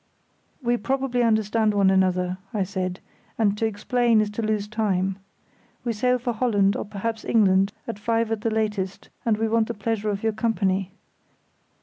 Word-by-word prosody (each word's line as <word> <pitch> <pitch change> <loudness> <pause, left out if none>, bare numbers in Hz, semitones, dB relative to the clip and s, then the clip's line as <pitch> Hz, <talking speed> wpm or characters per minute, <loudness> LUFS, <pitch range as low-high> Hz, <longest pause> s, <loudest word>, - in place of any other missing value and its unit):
"We 240 0 +2
probably 260 +1 0
understand 220 -1 +2
one 195 -1 +4
another," 185 -1 +1 0.2
I 200 - +2
said, 185 -1 -3 0.4
"and 205 -3 +2
to 225 - +2
explain 230 +2 +2
is 210 -1 +1
to 210 - -3
lose 215 -2 -1
time. 195 -3 0 0.6
We 235 - -1
sail 250 +4 +2
for 245 0 -2
Holland, 210 -4 +2
or - - -3
perhaps 215 +2 -4
England, 195 -3 +3 0.2
at 225 -3 -5
five 230 +1 0
at 220 -2 -1
the 225 - 0
latest, 210 -4 -2 0.2
and 220 -2 +3
we 225 +1 0
want 225 0 +2
the - - -4
pleasure 215 0 -1
of 200 0 -3
your 220 -1 +1
company. 200 -4 0
215 Hz, 170 wpm, -24 LUFS, 195-230 Hz, 0.6 s, one